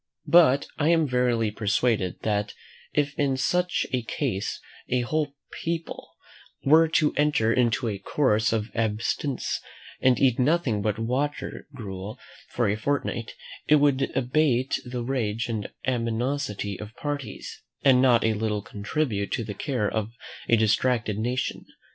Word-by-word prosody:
But 155 -5 +5
I 155 +1 +3
am 165 -2 +4
verily 125 -4 +1
persuaded 105 -2 0
that 105 -1 -1 0.4
if 145 -1 0
in 135 -2 +2
such 180 +6 +1
a 125 - +1
case 115 -3 -2 0.3
a 125 0 +2
whole 145 +3 -1 0.3
people 165 0 -4 0.5
were 160 +4 +6
to 155 -2 +2
enter 145 -7 +3
into 120 0 +1
a 100 -3 -3
course 110 -6 +1
of 110 0 -1
abstinence, 115 +4 -1 0.4
and 130 -1 +4
eat 130 -3 +3
nothing 130 -6 +2
but 105 0 0
water 130 +6 -2
gruel 100 -1 -6 0.3
for 120 -2 0
a 100 - +1
fortnight, 115 -1 -2 0.3
it 150 - +6
would 140 -2 +2
abate 130 0 +1
the 125 -1 -4
rage 115 -3 -1
and 110 -3 -3 0.2
animosity 115 -4 -1
of 105 +1 -9
parties, 145 -3 -5 0.2
and 130 -2 +6
not 125 -3 +5
a 110 - +2
little 105 -1 -2
contribute 105 0 -2
to 115 - -1
the 105 - -5
care 120 -1 -1
of 110 +1 -2 0.4
a 115 - +5
distracted 110 0 +1
nation. 125 +3 -2
125 Hz, 140 wpm, -26 LUFS, 110-140 Hz, 0.5 s, were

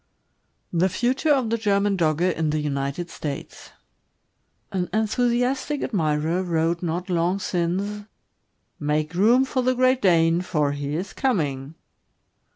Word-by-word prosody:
THE 175 +2 +3
FUTUKE 250 - -1
OF 260 -6 +2
THE 230 - 0
GERMAN 200 -1 +2
DOGGE 170 +1 +1
IN 160 -1 0
THE 155 - 0
UNITED 140 +3 -3
STATES. 145 -3 -7 1.0
An 180 -2 -2
enthusiastic 245 +6 0
admirer 160 -3 0
wrote 170 -1 0
not 175 +1 -3
long 175 +1 +1
since, 195 +3 -2 0.7
"Make 150 +2 -1
room 230 +8 +4
for 260 -1 -1
the 255 +1 +1
Great 255 +1 +3
Dane, 170 -2 +3
for 150 -5 0
lie 145 - -5
is 150 +7 -3
coming." 150 - -1
180 Hz, 130 wpm, -24 LUFS, 160-220 Hz, 1.0 s, room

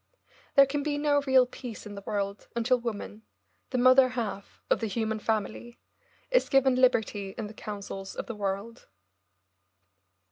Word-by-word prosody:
There 275 - +8
can 285 +2 -2
be 290 0 -1
no 290 -1 +2
real 260 -1 +6
peace 245 -3 -9
in 210 - -8
the 200 - -8
world 200 -1 -3
until 245 +2 +2
woman, 220 -2 -5 0.5
the 255 - -1
mother 255 +1 +6
half 220 -5 -5
of - - +2
the 225 - -2
human 220 +1 -2
family, 220 +3 -3 0.5
is - - +3
given 270 -1 +4
liberty 220 -6 +1
in 225 - -3
the 210 - -8
councils 200 -2 -7
of - - -4
the 230 - -5
world. 205 +3 -4
230 Hz, 155 wpm, -28 LUFS, 205-255 Hz, 0.5 s, There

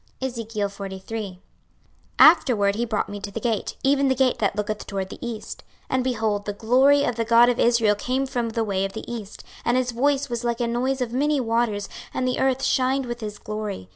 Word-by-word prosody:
26:043:001 205 -4 -4 0.8
Afterward 235 -11 +6
he 230 +3 -1
brought 220 -2 -1
me 205 - -6
to 200 - -6
the 200 - -5
gate, 225 -2 -2
even 275 0 +3
the 265 - +2
gate 260 -1 +2
that 200 -2 0
looketh 210 0 -3
toward 195 -1 -3
the - - -10
east: 230 -3 -6 0.2
26:043:002 - - -34
And, 260 -1 +1
behold, 220 -5 -1
the 205 - -3
glory 260 +7 +4
of 245 - -1
the 230 - +1
God 235 +1 +5
of 245 - 0
Israel 230 -3 +4
came 255 +6 -1
from 245 -3 -2
the 225 0 -1
way 195 -3 -1
of 195 0 -3
the 220 - -7
east: 220 -4 -7 0.2
and 240 +1 +2
his 250 -1 0
voice 280 +3 +1
was 240 -2 -4
like 235 0 -1
a 240 - +1
noise 255 +3 -1
of 240 -2 -2
many 290 +3 +1
waters: 230 -4 0 0.3
and 255 - 0
the 255 - -1
earth 265 0 +1
shined 265 +1 +1
with 240 -1 -5
his 210 -3 -6
glory. 210 - -5
235 Hz, 215 wpm, -24 LUFS, 210-255 Hz, 0.8 s, Afterward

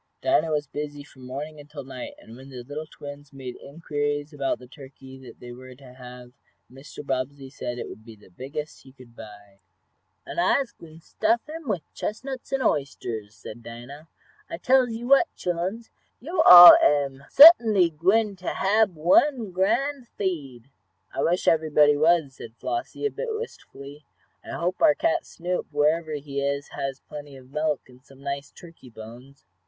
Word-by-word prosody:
Dinah 330 - +2
was 150 -1 -1
busy 145 0 -7
from 130 -3 -15
morning 150 +4 -7
until 145 -1 -10
night, 130 -1 -9
and 115 - -14
when 130 +2 -13
the 125 -2 -9
little 145 +4 -7
twins 145 -1 -11
made 130 -3 -8
inquiries 145 0 -4
about 140 -2 -2
the 125 - -14
turkey 130 -1 -13
they 120 - -10
were 130 +1 -12
to 130 -1 -16
have 125 -1 -12 0.4
Mr. 140 +2 -11
Bobbsey 135 0 -4
said 120 -3 -6
it - - -6
would 110 - -12
be 115 -1 -13
the 105 -3 -21
biggest 140 - -7
he 130 - -17
could 125 -3 -18
buy. 105 -3 -14 0.7
"An' - - -6
I'se 235 +8 +1
gwine 160 -1 -15
t' - - -14
stuff 225 - -1
him 315 -1 -9
wif 185 -6 -2
chestnuts 260 +4 -6
an' 270 -1 -1
oysters," 115 - -3
said 110 +2 -11
Dinah. 120 +7 -11 0.4
"I - - -5
tells 255 +6 +3
you 230 +1 -6
what, 275 +6 +5
chilluns, 185 +6 -4 0.3
yo' 325 +6 -1
all 175 -1 +12
am 140 -2 +1
suttinly 225 - +7
gwine 200 +6 +1
to 185 - -5
hab 200 -1 +2
one 215 - +2
grand 245 +8 -1
feed." 140 - -5 0.4
"I - - -3
wish 175 +2 0
everybody 150 -2 +4
was," 155 -2 +2
said 115 -3 -12
Flossie, 355 +4 -4
a 430 - 0
bit - - -5
wistfully. 145 - -10 0.4
"I - - -9
hope 175 +2 -3
our 310 -2 +5
cat 335 0 -1
Snoop, 180 +1 -4
wherever 155 +2 0
he 140 -1 -5
is, 140 0 -2
has 135 0 -5
plenty 145 -2 -11
of 130 0 -17
milk, 150 -1 -1
and 125 0 -20
some 135 0 -18
nice 140 0 -5
turkey 165 -7 -15
bones." 120 +5 -13
145 Hz, 170 wpm, -24 LUFS, 130-185 Hz, 0.7 s, all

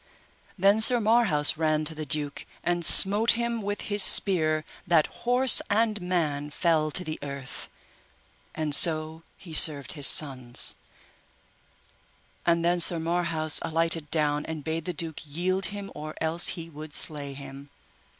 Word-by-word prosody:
Then 200 +3 +2
Sir 240 +2 +6
Marhaus 210 -11 +1
ran 155 -1 -1
to 160 - -1
the 155 -1 -8
duke, 145 0 -4 0.2
and 175 0 -2
smote 205 +6 +7
him 235 -1 -4
with 205 0 -5
his 205 -1 0
spear 155 -6 +3 0.2
that 165 -3 +2 0.2
horse 250 0 +4
and 215 -1 0
man 155 -5 -3
fell 155 0 -1
to 180 - -3
the 155 -2 -7
earth, 140 -2 -8 0.9
and 155 -2 -3
so 155 +1 +3 0.2
he 170 -4 -13
served 145 -3 +5
his 145 -3 +3
sons; 130 -5 +1 1.7
and 170 0 +1
then 175 +1 0
Sir 170 0 +2
Marhaus 165 -2 -1
alighted 165 -1 0
down 150 -2 0
and 160 -2 -7
bade 160 +1 -5
the 180 - -4
duke 160 -1 -5
yield 180 +6 -3
him 200 -1 -8
or 155 +1 -9
else 160 +2 -1
he 165 -1 -9
would 155 -1 -11
slay 145 -3 -3
him. 140 0 -12
160 Hz, 150 wpm, -25 LUFS, 150-185 Hz, 1.7 s, smote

